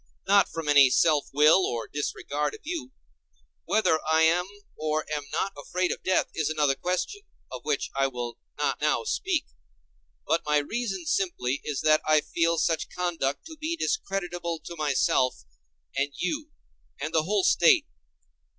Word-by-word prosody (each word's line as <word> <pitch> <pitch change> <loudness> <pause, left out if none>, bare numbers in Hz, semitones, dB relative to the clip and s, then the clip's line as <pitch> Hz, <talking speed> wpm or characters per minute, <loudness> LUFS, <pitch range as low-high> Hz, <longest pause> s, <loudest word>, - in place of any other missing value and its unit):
Not 200 0 +5
from 165 -2 -5
any 145 -2 +7
self 150 +2 +3
will 150 +6 +5
or 120 -7 -2
disregard 145 0 -3
of - - -14
you. 300 -5 -5 0.7
Whether 160 -7 +2
I 160 0 +5
am 175 +3 +3 0.3
or 155 0 -1
am 145 -1 -4
not 190 +5 -1
afraid 180 +5 -2
of - - -4
death 185 - +2
is 155 -2 -1
another 150 -3 +2
question, 180 - -3 0.3
of 125 -2 -7
which 150 -2 -1
I 135 0 +2
will 120 -2 -6 0.2
not - - -1
now - - +1
speak. - - -1 0.8
But 165 - +1
my 150 0 +2
reason 195 +3 -2
simply 145 -7 -1
is 145 -3 -3
that 155 0 +4
I 155 -1 +4
feel 165 +2 0
such 160 0 0
conduct 170 -6 -2
to 320 -1 -10
be 315 +2 -2
discreditable 175 - -2
to 170 - -7
myself, 135 - +1 0.5
and 140 +1 0
you, 295 - -3 0.5
and - - -4
the 160 - +4
whole 200 +1 +1
State. 350 - +5
160 Hz, 160 wpm, -27 LUFS, 145-185 Hz, 0.8 s, any